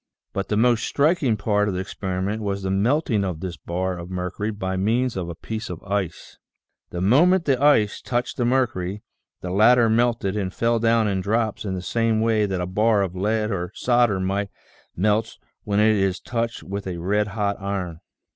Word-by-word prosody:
But 100 -1 -2
the 105 - 0
most 120 0 +3
striking 145 -6 +2
part 105 0 +1
of 100 - -1
the - - -2
experiment 95 +2 -3
was 100 -1 -3
the 95 - -1
melting 110 +2 +1
of 90 -5 -3
this 90 0 -5
bar 90 +4 -3
of 85 +1 -8
mercury 90 +3 -3
by 95 -3 -3
means 115 +6 +1
of 90 -3 -3
a 85 - -6
piece 110 +6 -6
of 90 -2 -6
ice. 100 -4 -4 0.5
The 90 - -5
moment 165 - +4
the 135 -3 +1
ice 140 -8 +3
touched 120 0 -2
the 125 - 0
mercury, 110 -6 0 0.4
the 90 - -5
latter 115 +4 +5
melted 115 -4 +1
and 95 -3 -2
fell 115 +4 +1
down 115 -1 +3
in 95 -2 0
drops 110 +2 -1
in 95 -2 -2
the 90 - -5
same 115 +3 +1
way 110 -2 +2
that 95 -2 -2
a 90 - -1
bar 105 +3 +2
of 95 -2 -4
lead 105 +3 0
or 90 -2 -3
solder 120 -5 +2 0.8
melts 105 +4 0 0.3
when 100 0 +1
it 110 0 +4
is 95 -1 0
touched 115 -1 -3
with 100 0 -5
a 90 -2 -4
red 105 +5 0
hot 100 0 -1
iron. 95 -4 -3
105 Hz, 195 wpm, -23 LUFS, 95-115 Hz, 0.8 s, latter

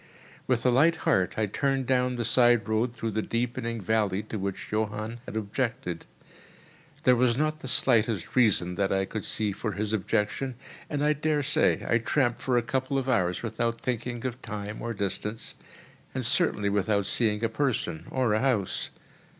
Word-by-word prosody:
With 125 -2 +1
a 125 - +5
light 155 +7 +5
heart 95 -1 +2
I 110 - +2
turned 135 +5 0
down 125 0 +2
the 120 -1 -2
side 120 -2 +4
road 115 +2 0
through 115 -1 -3
the 110 +1 0
deepening 115 0 -2
valley 105 -1 0
to 110 - -5
which 95 0 -4
Johann 110 +2 -2
had - - -4
objected. 110 -3 -3 1.0
There 125 - +6
was 120 -1 +2
not 155 +1 0
the 130 - -7
slightest 115 -6 +2
reason, 105 -8 +3
that 100 -1 +1
I 95 0 +2
could 105 +1 -5
see, 105 -2 -1
for 105 +2 -3
his 105 +1 -2
objection; 110 +5 -1 0.3
and 145 -1 -1
I 150 +1 +4
daresay 150 -1 +1
I 115 - +3
tramped 120 0 +1
for 125 -2 +1
a 120 - +2
couple 130 +3 -1
of 135 -1 -1
hours 90 -8 +1
without 115 +1 -1
thinking 120 0 -3
of 125 -1 -4
time 105 0 -6
or 115 -1 -3
distance, 105 +2 -3 0.6
and - - -1
certainly 100 -1 +2
without 100 0 +1
seeing 105 +1 +1
a - - +4
person 115 - -2
or 125 -5 +1
a 110 - +2
house. 120 -8 0
115 Hz, 175 wpm, -27 LUFS, 105-125 Hz, 1.0 s, There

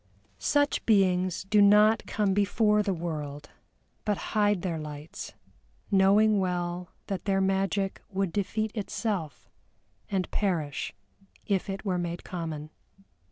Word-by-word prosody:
Such 290 0 +1
beings 185 -4 +3
do 205 +2 +3
not 210 +2 +5
come 205 -3 +1
before 210 +1 +3
the 205 -1 0
world, 150 -4 -5 0.5
but 210 -2 0 0.2
hide 205 -4 +2
their 170 -4 -2
lights, 150 0 -7 0.6
knowing 200 +2 +5
well 180 -1 -2 0.2
that 195 -2 -4
their 195 -1 +2
magic 195 0 0
would 195 -4 -1
defeat 215 +2 -1
itself, 200 - -3 0.6
and 190 -2 -1
perish 165 -8 -1 0.5
if 200 -1 0
it 195 +2 -5
were 185 -3 0
made 175 0 -4
common. 160 -4 -5
195 Hz, 120 wpm, -28 LUFS, 175-205 Hz, 0.6 s, not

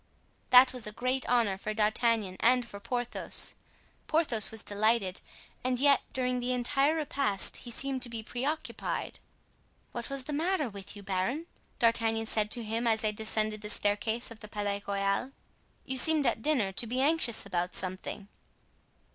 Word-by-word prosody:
That 255 +1 +8
was 245 -4 -1
a - - -5
great 255 +4 -2
honor 225 -6 +2
for 215 +1 -4
D'Artagnan 215 -2 +1
and 250 +1 +3
for 200 - -9
Porthos. 245 +3 -1 0.5
Porthos 295 -9 +2
was 220 -1 -7
delighted; 205 -2 +1 0.4
and 250 -1 0
yet 280 0 +5
during 250 -1 0
the 250 +1 -1
entire 275 +5 +2
repast 275 -10 +2
he 245 - -7
seemed 265 +2 -1
to 245 - -1
be 230 -1 -6
preoccupied. 280 +8 -4 0.7
"What 240 -1 -6
was 275 -1 -3
the 295 - -5
matter 315 -2 0
with 200 -1 -7
you, 205 - -10
baron?" 195 - -2 0.3
D'Artagnan 230 -2 +2
said 215 -1 +1
to 235 +1 -1
him 225 +2 -2
as 220 -1 +2
they 215 - +1
descended 215 0 0
the 210 - -6
staircase 220 +3 -1
of 225 - -10
the 210 - -9
Palais 205 -1 -2
Royal. 200 +6 -1 0.5
"You 265 - -1
seemed 310 +2 +6
at 235 -2 +1
dinner 245 -9 +1
to 230 +5 0
be 250 +3 -2
anxious 275 -6 +2
about 180 -2 -2
something." 185 +2 -4
230 Hz, 165 wpm, -30 LUFS, 210-255 Hz, 0.7 s, That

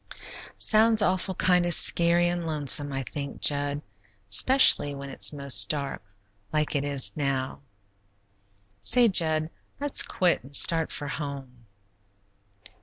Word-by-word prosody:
"Sounds 220 0 +1
awful 185 0 -2
kind 180 0 +1
of 175 -1 +5
scary 170 0 +1
an' 175 -1 -4
lonesome, 145 -2 +1
I 135 0 -5
think, 140 +2 -8
Jud, 145 0 0 0.5
'specially 145 - +4
when 140 0 -10
it's - - 0
most 140 -9 +2
dark, 140 -8 -4 0.5
like 155 0 -2
it 140 - -2
is 135 -8 -1
now. 135 -3 -4 1.2
Say, 240 - +2
Jud, 160 -3 0 0.3
let's 285 -1 +2
quit 180 -7 -1
and 140 +2 -8
start 165 +1 +3
for 145 - -5
home." 135 -5 -9
145 Hz, 125 wpm, -24 LUFS, 140-175 Hz, 1.2 s, of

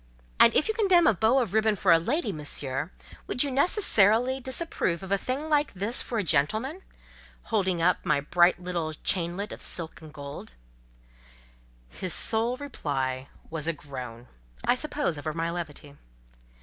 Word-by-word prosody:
"And - - +8
if - - +3
you 440 - 0
condemn 380 -6 +4
a 225 - +5
bow 220 +7 +2
of 235 -8 0
ribbon 220 -1 +3
for 190 -2 +2
a 165 - +7
lady, 240 - -1
Monsieur, 145 -2 -3 0.2
you - - -15
would 250 - +2
necessarily 260 - +3
disapprove 260 - -2
of 190 - -8
a 200 - +3
thing 270 +8 -3
like 300 -1 +1
this 205 +6 0
for 235 - -4
a 210 - 0
gentleman?"—holding 195 - -2
up 180 +1 +2
my 150 -2 +2
bright 175 +5 +3
little 175 -3 -3
chainlet 180 +3 -1
of - - -8
silk 165 -1 -2
and 155 -1 -12
gold. 140 - -9 1.3
His 175 - 0
sole 230 +2 +1
reply 135 - -3 0.2
was 160 -1 -3
a 165 - +2
groan—I 120 - -5
suppose 285 - -2
over 155 +1 -4
my 165 0 -1
levity. 150 -4 -7
185 Hz, 155 wpm, -27 LUFS, 155-250 Hz, 1.3 s, And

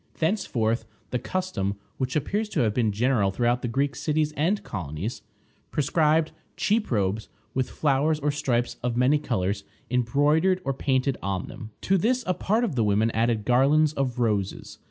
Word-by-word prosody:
Thenceforth 120 - 0 0.3
the 125 - 0
custom, 125 - -2 0.2
which 130 -1 -2
appears 210 +8 -1
to - - 0
have 110 -3 +2
been 115 -3 +1
general 110 -1 +2
throughout 120 +5 +1
the - - -2
Greek 140 +4 0
cities 155 0 0
and 175 +8 +1
colonies, 90 - -5 0.5
prescribed 155 +1 +2 0.3
cheap 210 +2 +1
robes, 105 -1 0 0.2
with 130 -1 -1
flowers 150 +1 +1
or 150 0 +1
stripes 125 -5 -1
of 120 -1 -1
many 130 +4 +4
colors 100 -8 -1 0.3
embroidered 145 +9 +3
or 135 - 0
painted 130 0 0
on 95 -2 -2
them. 110 - -8
To 195 0 +2
this 250 +6 +1
a 185 - +1
part 215 +6 0
of 220 -9 0
the 120 -4 +1
women 105 +2 +2
added 115 -1 0
garlands 145 +5 +4
of 135 -4 -1
roses. 105 -5 -1
130 Hz, 165 wpm, -26 LUFS, 115-155 Hz, 0.5 s, many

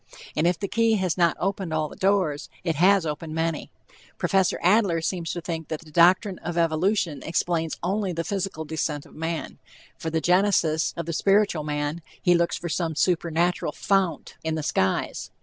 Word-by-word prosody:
And 155 +3 +2
if 175 -1 +2
the 200 - -3
key 225 +3 +2
has 185 -5 0
not 170 -3 +2
opened 195 -3 -2
all 155 -1 0
the - - -12
doors, 185 -7 +1
it 165 -2 0
has 190 +1 +4
opened 155 +1 -4
many. 165 -1 -2 0.5
Prof. 190 -2 +2
Adler 185 -2 +3
seems 165 0 -2
to 175 - -4
think 160 -2 -5
that 155 - -4
the 160 -2 -15
doctrine 180 +4 +4
of 170 +1 -5
evolution 165 0 +1
explains 165 -1 -1
only 195 +2 0
the 165 -1 -2
physical 190 -4 -3
descent 150 -1 -3
of - - -17
man; 160 +1 -4 0.4
for 165 - -3
the 160 0 0
genesis 175 -3 +2
of 170 - -3
the 170 - -3
spiritual 195 -3 +2
man, 150 +2 -2 0.2
he 180 - +3
looks 170 0 +1
for 175 - -5
some 165 -1 -1
supernatural 170 -1 +1
"fount" 195 -3 0
in 160 0 -1
the 155 - -3
skies. 95 -10 -1
170 Hz, 185 wpm, -25 LUFS, 160-185 Hz, 0.5 s, has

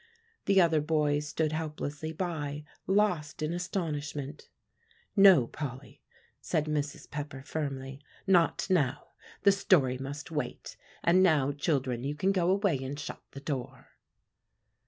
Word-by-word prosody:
The 195 -1 +5
other 165 -4 +4
boys 150 -1 +1
stood 155 0 0
helplessly 155 -1 -4
by, 155 -4 -3 0.2
lost 180 -7 +1
in 155 +2 -1
astonishment. 150 -5 -4 0.7
"No, 195 - +8
Polly," 135 0 -7 0.4
said 150 - 0
Mrs. 150 -2 -3
Pepper 145 -2 -6
firmly, 135 -2 -4 0.2
"not 180 -4 +3
now; 155 -10 +1 0.3
the 200 - +7
story 145 -10 +3
must 145 +3 -6
wait. 150 -2 -4 0.3
And 175 +2 +5
now, 150 -7 +4
children, 135 -4 -1
you 145 +2 -2
can 190 +6 +1
go 180 -3 +1
away 195 -6 +2
and 140 +2 -5
shut - - -6
the 140 - -8
door." 135 -3 -5
150 Hz, 130 wpm, -30 LUFS, 140-170 Hz, 0.7 s, No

